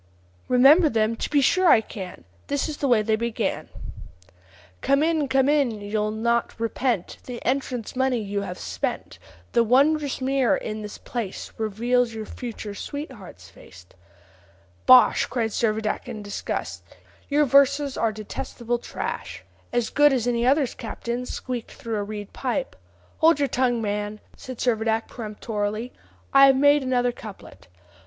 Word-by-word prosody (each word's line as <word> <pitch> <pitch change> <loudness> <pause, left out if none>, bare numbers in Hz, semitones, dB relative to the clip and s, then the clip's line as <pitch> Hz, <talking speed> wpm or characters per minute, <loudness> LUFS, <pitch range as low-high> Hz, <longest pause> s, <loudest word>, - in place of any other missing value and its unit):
"Remember 280 +7 +6
them! 225 -2 +1
to - - -3
be 290 -2 +3
sure 370 +6 +4
I 230 - +7
can. 190 - -8 0.2
This 285 -1 -1
is 305 -2 -5
the 280 - -1
way 235 -4 +4
they 220 0 +2
began: 235 +1 -2 1.1
'Come 275 +2 +3
in! 315 -3 +1
come 265 0 +2
in! 280 -7 +2
you'll 210 +1 -1
not 235 +2 -1
repent 230 -3 -1
The 245 -2 -6
entrance 255 -3 -2
money 260 -1 +1
you 205 -2 -3
have 180 -2 -6
spent; - - -4 0.3
The 235 - +4
wondrous 280 +4 +2
mirror 265 -1 +2
in 215 0 -5
this 210 -1 -7
place 230 -6 -5
Reveals 230 +2 0
your 220 -1 -5
future 225 -4 -7
sweetheart's 210 - -8
face.'" 90 -1 -15 1.0
"Bosh!" 125 0 +7
cried 230 -3 -1
Servadac 215 0 -1
in 220 -4 -6
disgust; 205 0 -4 0.5
"your 295 +1 +3
verses 280 +1 +3
are 225 - +1
detestable 230 +3 -4
trash." - - -6 0.3
"As 240 -1 0
good 290 0 +5
as 250 -4 0
any 240 0 +1
others, 275 -1 +2
captain, 235 +2 -5
squeaked 245 -3 -5
through 225 -2 -4
a 205 - -1
reed 205 -1 -7
pipe." 235 - -3 0.4
"Hold 325 -1 +5
your 285 -1 +1
tongue, 245 -3 0
man," 210 0 -3 0.2
said 255 -1 -9
Servadac 225 -2 0
peremptorily; 215 0 -4 0.4
"I 275 0 +8
have 270 - +5
made 285 +2 +5
another 250 -2 +1
couplet. 200 - -12
235 Hz, 150 wpm, -24 LUFS, 215-270 Hz, 1.1 s, I